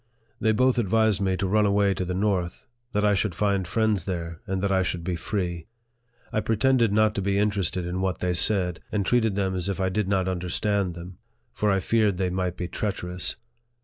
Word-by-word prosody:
They 110 - +2
both 130 +3 +3
advised 110 -1 +2
me 95 -1 +1
to 95 - -1
run 105 +2 +3
away 100 0 +3
to 95 - -3
the 90 0 -3
north; 95 -3 -1 0.3
that 105 -1 +1
I 105 - +4
should 95 -2 0
find 100 -3 0
friends 110 -2 +1
there, 85 -3 -4
and 95 0 -1
that 100 - +1
I 95 -1 +3
should 90 -2 -2
be 90 0 -2
free. 85 -3 -3 0.7
I 110 - +1
pre 115 - 0
tended 120 -2 +3
not 110 +1 +3
to 100 - -2
be 100 +1 0
interested 100 -4 0
in 90 +1 -3
what 95 -1 -1
they 90 0 -1
said, 90 -2 +2
and 100 -2 0
treated 115 -2 +2
them 95 -2 0
as 95 +1 -1
if 95 - -3
I 95 0 +1
did 105 +1 -1
not 95 -2 +1
understand 95 +1 -1
them; 90 +1 -10 0.3
for 105 - 0
I 95 -1 +3
feared 105 -1 +1
they 90 -1 0
might 90 -1 -2
be 90 - -3
treacherous. 90 -3 -3
95 Hz, 215 wpm, -25 LUFS, 90-105 Hz, 0.7 s, I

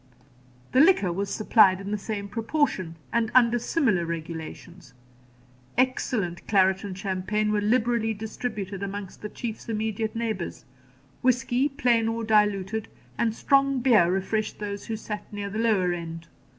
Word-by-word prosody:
The 260 - +3
liquor 280 - +5
was 200 +2 -2
supplied 200 -3 +4
in 195 +1 -6
the - - +1
same 200 0 -4
proportion, 220 - -1 0.2
and 230 -1 +1
under 240 -1 +5
similar 230 - +1
regulations. 165 0 -7 0.8
Excellent 240 -8 0
claret 190 -2 +3
and 195 -2 -6
champagne 200 +2 -1
were 210 -1 +1
liberally 225 0 +1
distributed 210 -2 -5
among 200 -1 -5
the 210 - -5
Chief's 230 0 -6
immediate 220 0 -2
neighbours; 220 -6 -3 0.6
whisky, 255 +2 +2
plain 245 -5 +2
or 225 0 -2
diluted, 210 -1 +1 0.3
and 225 -2 0
strong 275 0 +3
beer 225 -9 +4
refreshed 195 +3 -1
those 205 -1 -5
who 225 - -2
sat 210 -1 -7
near 205 -1 -5
the 215 - -3
lower 200 -6 +2
end. 165 -1 -6
210 Hz, 140 wpm, -26 LUFS, 190-230 Hz, 0.8 s, liquor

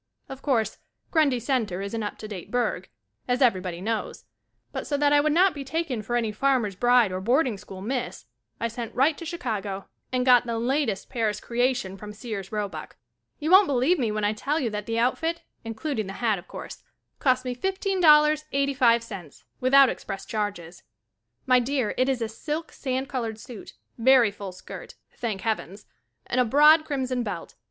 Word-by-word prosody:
Of 270 0 -8
course, 225 -7 0 0.3
Grundy 295 -6 +3
Center 225 -7 -1
is 200 +2 -5
an 225 - -2
up 205 - -4
to 215 - -8
date 190 -3 -8
burg, 220 -6 -1 0.4
as 245 0 +1
everybody 185 -9 +1
knows, 215 - -3 0.5
but - - -5
so 285 - 0
that 290 0 +3
I 290 - +6
would 300 +1 +2
not 365 +4 +4
be 285 - -6
taken 275 -4 -2
for 240 +3 -3
any 230 -3 0
farmer's 235 -3 +1
bride 240 -1 +4
or 185 0 -3
boarding 245 +3 +2
school 190 -1 -10
Miss, 245 - -3 0.3
I 230 - 0
sent 230 0 -6
right 285 +4 +3
to 335 - -6
Chicago 215 - -4 0.3
and 250 -1 0
got 245 -1 +6
the 230 -1 -1
latest 240 -3 -1
Paris 225 -4 -1
creation 245 -5 -1
from 210 +1 -9
Sears 210 -3 -6
Robuck. 200 -7 -4 0.4
You 310 +3 -2
won't 380 +1 +8
believe 280 +6 +2
me 230 -4 0
when 215 0 -2
I 205 +1 +2
tell 285 +8 -1
you 235 -6 -1
that 210 -1 -5
the 230 0 -1
outfit, 325 +8 0 0.2
including 225 0 -3
the 195 - -6
hat 220 -3 0
of 175 - -15
course, - - -9 0.4
cost 255 -1 +2
me 250 -1 -2
$15.85 300 - +2 0.2
without 270 +2 +6
express 195 - -6
charges. 205 -6 -4 0.6
My 255 -1 +5
dear, 250 -2 -1
it 255 +1 +2
is 255 -3 0
a - - -1
silk 300 +8 -5
sand 260 0 -3
colored 230 -6 -3
suit, 235 -2 -10 0.3
very 245 -2 +5
full 200 -1 -7
skirt, 185 - -10 0.2
thank 215 -5 -3
heavens, 210 -2 -3 0.4
and 250 - +1
a - - +3
broad 300 +6 +6
crimson 260 -4 -2
belt. 205 -7 -5
245 Hz, 180 wpm, -26 LUFS, 210-275 Hz, 0.6 s, won't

